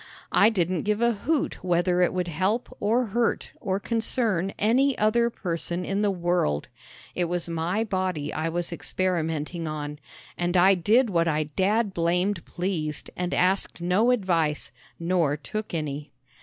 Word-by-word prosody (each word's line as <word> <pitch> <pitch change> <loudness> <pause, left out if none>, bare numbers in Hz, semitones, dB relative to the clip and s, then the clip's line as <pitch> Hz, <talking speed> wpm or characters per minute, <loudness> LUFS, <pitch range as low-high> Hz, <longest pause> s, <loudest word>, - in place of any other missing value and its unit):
I 210 - +6
didn't 180 -5 0
give 210 0 0
a 235 0 +3
hoot 275 - -1
whether 180 0 +2
it 180 - +3
would 180 -1 -2
help 190 +9 -1
or 230 +5 +2
hurt 240 -1 0
or 195 -3 -1
concern 220 -4 0
any 255 +6 +3
other 235 +3 +3
person 175 -4 -3
in 200 +1 -1
the 210 - +2
world. 175 - 0 0.4
It 180 - 0
was 175 0 -2
my 170 +6 -1
body 185 -8 -2
I 160 +1 -1
was 175 +1 -2
experimenting 165 -2 -2
on, 150 -1 -5 0.4
and 175 +1 +1
I 190 +2 +6
did 215 +6 +3
what 170 -2 +2
I 155 -1 +1
dad 195 +8 0
blamed 180 +2 0
pleased 175 -4 -3
and 180 0 -2
asked 185 +1 +1
no 180 +7 +2
advice 170 -10 +1 0.3
nor 170 -4 +1
took 215 +8 -5
any. 150 -2 -4
180 Hz, 155 wpm, -26 LUFS, 165-210 Hz, 0.4 s, I